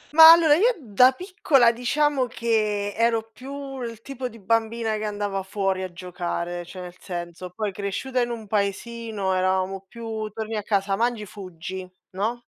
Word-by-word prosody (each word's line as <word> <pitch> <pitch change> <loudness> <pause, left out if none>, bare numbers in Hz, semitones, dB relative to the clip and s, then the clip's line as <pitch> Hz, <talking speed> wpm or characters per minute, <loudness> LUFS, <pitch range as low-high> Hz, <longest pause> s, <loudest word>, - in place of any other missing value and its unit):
Ma 320 0 +12
allora 330 -3 +7
io 455 +9 +4
da 250 +1 +5
piccola 285 -7 +3
diciamo 260 +3 +1
che 215 -3 0
ero 225 -1 +1
più 270 +1 -7
il 230 -2 -5
tipo 260 0 -5
di 230 - -13
bambina 225 +2 0
che 215 - -3
andava 205 -2 -2
fuori 195 0 -1
a 185 -1 -4
giocare, 175 -1 -4
cioè 185 +2 -9
nel 180 0 -9
senso, 175 0 -6
poi 210 +3 -3
cresciuta 205 +7 -2
in 240 - 0
un 230 -2 -5
paesino 210 0 -2
eravamo 185 +1 0
più: 220 -1 -5
torni 220 +1 -5
a 210 - -1
casa, 200 -1 0
mangi, 230 0 0
fuggi, 185 -1 -8 0.2
no, 220 +6 -2
215 Hz, 160 wpm, -24 LUFS, 190-240 Hz, 0.2 s, Ma